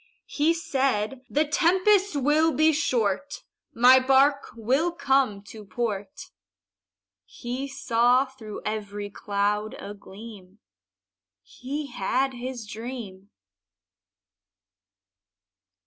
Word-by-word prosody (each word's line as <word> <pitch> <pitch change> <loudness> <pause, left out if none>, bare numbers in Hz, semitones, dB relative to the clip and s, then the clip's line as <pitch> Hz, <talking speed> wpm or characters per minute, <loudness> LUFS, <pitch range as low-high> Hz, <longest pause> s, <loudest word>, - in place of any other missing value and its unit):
He 305 +3 +1
said, 265 -6 -1
"The 300 +2 +2
tempest 370 +4 +3
will 300 +4 +3
be 315 +1 +3
short, 255 -3 -1 0.3
My 250 +2 +6
bark 275 +2 +3
will 265 +10 +1
come 265 -10 +1
to 215 +1 -11
port." 235 - -5 0.9
He 255 +3 -6
saw 250 -1 +2
through 240 -6 -10
every 205 -1 -4
cloud 205 +1 -2
a 205 - -8
gleam 200 -1 -13 0.9
He 275 - -6
had 260 +6 0
his 245 -1 -6
dream. 210 -3 -8
250 Hz, 90 wpm, -25 LUFS, 210-280 Hz, 0.9 s, My